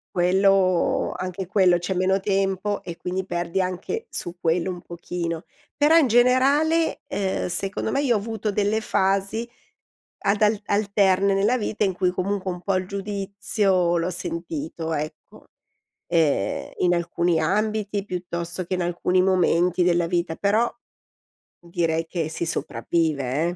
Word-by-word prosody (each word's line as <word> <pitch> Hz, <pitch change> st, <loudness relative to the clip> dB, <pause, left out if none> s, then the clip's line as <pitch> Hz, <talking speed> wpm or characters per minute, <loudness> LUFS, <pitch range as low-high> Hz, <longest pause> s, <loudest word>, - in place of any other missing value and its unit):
Quello 185 Hz, 0 st, +3 dB
anche 185 Hz, 0 st, -4 dB
quello, 185 Hz, -2 st, +4 dB
c'è 180 Hz, +2 st, -3 dB
meno 190 Hz, +1 st, +2 dB
tempo 195 Hz, +1 st, -1 dB
e 170 Hz, -2 st, -7 dB
quindi 185 Hz, +1 st, -3 dB
perdi 175 Hz, +1 st, -1 dB
anche 185 Hz, -, -3 dB
su 175 Hz, 0 st, -5 dB
quello 170 Hz, +2 st, +1 dB
un 175 Hz, -1 st, -5 dB
pochino. 170 Hz, -1 st, -5 dB, 0.3 s
Però 300 Hz, +3 st, +5 dB
in 305 Hz, -6 st, +5 dB
generale, 275 Hz, +7 st, +3 dB
ehm, 195 Hz, -6 st, -2 dB
secondo 190 Hz, +3 st, -1 dB
me, 280 Hz, -, +1 dB
io 245 Hz, -5 st, +2 dB
ho -, -, +3 dB
avuto 220 Hz, 0 st, -3 dB
delle 210 Hz, +2 st, +1 dB
fasi 195 Hz, +4 st, 0 dB, 0.7 s
ad 200 Hz, +2 st, +1 dB
al 210 Hz, 0 st, +3 dB
alterne 200 Hz, -1 st, +2 dB
nella 210 Hz, +6 st, +2 dB
vita 210 Hz, -1 st, -1 dB
in 190 Hz, -, 0 dB
cui 180 Hz, 0 st, +1 dB
comunque 185 Hz, +1 st, -2 dB
un 180 Hz, -, -7 dB
po' 195 Hz, +1 st, 0 dB
il 185 Hz, 0 st, -1 dB
giudizio 200 Hz, -2 st, 0 dB
l'ho 170 Hz, +2 st, 0 dB
sentito, 165 Hz, -2 st, -4 dB
ecco. 155 Hz, +1 st, -6 dB, 0.6 s
Ehm, 155 Hz, -, +1 dB
in 175 Hz, 0 st, +2 dB
alcuni 170 Hz, 0 st, 0 dB
ambiti 210 Hz, +2 st, 0 dB
piuttosto 175 Hz, -1 st, -4 dB
che 185 Hz, -, -2 dB
in 180 Hz, -, -2 dB
alcuni 175 Hz, +1 st, +1 dB
momenti 180 Hz, -1 st, +2 dB
della 175 Hz, -1 st, +2 dB
vita, 170 Hz, -2 st, -1 dB
però 215 Hz, +4 st, +1 dB, 0.9 s
direi 165 Hz, -1 st, -1 dB
che 160 Hz, -2 st, -2 dB
si 165 Hz, +1 st, -3 dB
sopravvive, 155 Hz, -4 st, -1 dB
eh. -, -, +1 dB
185 Hz, 145 wpm, -24 LUFS, 175-205 Hz, 0.9 s, Però